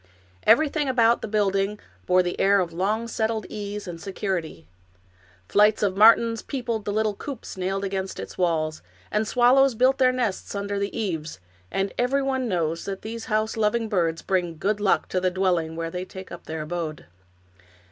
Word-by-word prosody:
Everything 300 -2 +4
about 235 -2 +3
the - - -4
building 205 -1 0 0.3
bore 180 0 +4
the 175 - -3
air 200 +1 +4
of 175 -3 -2
long 210 +6 -1
settled 220 -1 -1
ease 205 -1 -5
and 170 -2 -7
security. 185 - -4 0.8
Flights 210 - +4
of 195 -2 +1
martins 230 +2 +5
peopled 235 -6 -3
the 205 - -1
little 215 0 +1
coops 265 +4 -7
nailed 190 +1 -2
against 190 -1 -3
its - - -7
walls, 160 -3 0 0.3
and 215 +1 0
swallows 255 +2 +4
built 260 +4 +3
their 255 -1 +5
nests 235 -6 -2
under 200 0 -2
the 200 0 -3
eaves, 165 - -3 0.3
and 195 - -1
everyone 265 0 +1
knows 165 -3 -1
that 195 -1 -5
these 225 +1 -6
house 215 -1 0
loving 225 +1 +1
birds 170 -6 0
bring 175 -4 -1
good 205 +5 0
luck 205 -2 +2
to 185 - 0
the 185 - +2
dwelling 180 -3 0
where 165 0 -4
they 180 +1 -4
take 190 0 -10
up 170 - -9
their 160 -1 -4
abode. 155 -2 -4
200 Hz, 175 wpm, -25 LUFS, 180-225 Hz, 0.8 s, martins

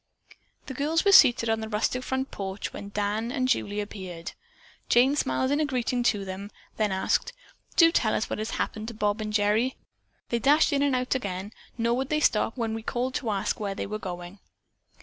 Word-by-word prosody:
The 265 - -6
girls 305 +6 0
were 400 - +6
seated 240 -10 +7
on 225 0 +1
the 220 0 -5
rustic 220 +4 0
front 265 +1 -3
porch 195 0 -5
when 200 - -7
Dan 210 +3 -2
and 255 -1 0
Julie 210 -5 0
appeared. 185 -5 -6 0.6
Jane 260 +4 +5
smiled 265 -2 0
a 295 +2 +2
greeting 250 -2 -1
to 210 -4 +1
them, 190 +2 -6 0.3
then 215 -2 +1
asked: 190 - 0 0.4
"Do 330 -1 +7
tell 220 -9 +2
us - - -1
what - - -4
has 215 - -3
happened 215 0 -3
to 230 - -6
Bob 210 0 0
and 215 0 -3
Gerry. 210 +4 +2 0.5
They 235 - 0
dashed 290 +5 +4
in 280 - +2
and 280 -2 +2
out 255 0 0
again, 200 -4 -4 0.2
nor 235 0 +1
would 265 0 -2
they 305 - +1
stop 225 -4 +2
when 225 -2 -1
we 225 - -4
called 245 +3 -2
to 250 -4 -2
ask 200 -1 -1
where 200 -2 -3
they - - -3
were 215 +1 -4
going?" 180 0 -7
225 Hz, 205 wpm, -27 LUFS, 205-260 Hz, 0.6 s, seated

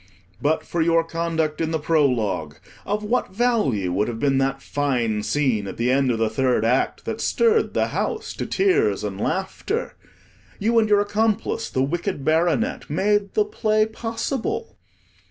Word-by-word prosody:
But 155 +2 +1
for 170 - -2
your 165 0 +3
conduct 165 -2 -2
in 160 - 0
the 160 - 0
Prologue, 125 - 0 0.3
of 210 +1 -1
what 210 -3 -1
value 145 - +1
would 100 +3 +1
have 115 -2 -4
been 135 0 +2
that 135 0 0
fine 125 -8 -1
scene 120 -5 0
at 95 - -7
the 120 +2 +1
end 135 0 +2
of 120 - +1
the 110 0 +1
Third 125 0 +1
Act, 125 +3 0
that - - -4
stirred 450 -1 +2
the - - +1
house 445 -2 -3
to - - -3
tears 405 +2 +2
and - - -4
laughter? - - -2 0.6
You 230 +3 +2
and 215 -1 +1
your 205 -1 +5
accomplice, 210 +1 0
the 130 - 0
Wicked 170 0 -2
Baronet, 160 -5 +1
made 200 +5 +1
the 425 - +3
play 215 - +1
possible. 240 - -3
160 Hz, 165 wpm, -23 LUFS, 130-215 Hz, 0.6 s, your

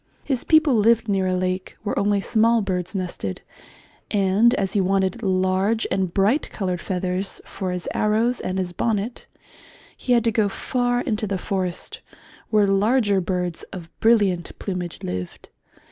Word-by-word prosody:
His 265 -4 -1
people 315 -3 +4
lived 225 0 +3
near 195 -2 +1
a 185 - +1
lake 185 0 -2
where 205 - -1
only 200 0 +2
small 225 +1 +3
birds 180 -1 -3
nested, 175 - -4 0.7
and 205 +4 +3
as 195 -4 -1
he 205 - +2
wanted 190 +4 0
large 190 +2 +1
and 190 -2 0
bright 205 - +2
coloured 185 -4 -3
feathers 185 +1 -2
for 190 - -5
his 180 -1 -4
arrows 225 +4 +1
and 185 - -3
his 185 -2 -2
bonnet 220 +4 -2 0.7
he 250 - 0
had 235 -2 +4
to 230 - +2
go 215 -2 +2
far 245 +3 -1
into 215 -3 -2
the 195 -1 -1
forest, 185 -2 -3 0.5
where 210 -2 +4
larger 200 +1 +2
birds 180 -1 -2
of 175 -4 -9
brilliant 205 -6 +2
plumage 180 -4 -5
lived. 90 0 -5
195 Hz, 155 wpm, -23 LUFS, 185-225 Hz, 0.7 s, people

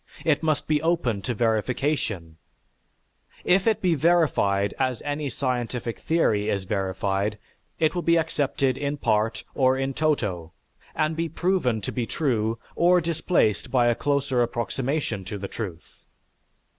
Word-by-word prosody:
It 150 -3 +3
must 155 -2 0
be 150 -1 +2
open 160 - 0
to 120 +4 -3
verification; 110 - -1 1.1
if 190 +3 +3
it 220 -3 +2
be 180 -2 +3
verified 140 - +2
as 130 -3 -1
any 145 0 -2
scientific 125 -2 -3
theory 110 -11 +1
is 100 -1 -1
verified, 95 +1 -1 0.4
it 155 - +2
will 175 - -1
be 170 0 +3
accepted 140 -4 0
in 145 0 -2
part, 110 -3 0
or 130 -1 +3
in 135 0 -1
toto, 105 - -1 0.4
and 155 0 0
be 165 0 -2
proven 165 - 0
to - - -4
be 120 -3 -2
true 115 -7 0 0.2
or 180 +1 +5
displaced 165 - +1
by 120 -2 +3
a - - +4
closer 140 -2 0
approximation 120 -1 -2
to 100 +2 -5
the 100 0 -5
truth. 95 -6 -8
130 Hz, 145 wpm, -25 LUFS, 110-155 Hz, 1.1 s, or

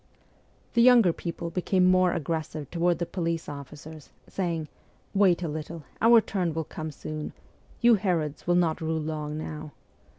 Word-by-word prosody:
The 235 - +4
younger 235 -8 +6
people 170 0 -5
became 185 +1 +1
more 185 0 +4
aggressive 155 -2 -3
toward 175 0 +1
the 170 - -2
police 170 -2 -3
officers, 150 +2 -9 0.2
saying: 170 -5 -2 0.3
' - - -36
Wait 180 -3 +4
a - - -1
little; 155 +1 -6 0.2
our 230 +1 +7
turn 180 -7 -2
will 160 - -1
come 155 +1 -6
soon: 155 0 -6 0.5
you 240 -1 +6
Herods 175 -9 -1
will 175 - +3
not 170 -1 +1
rule 160 0 -1
long 150 -1 -4
now.' 155 -1 -6
165 Hz, 160 wpm, -27 LUFS, 155-180 Hz, 0.5 s, our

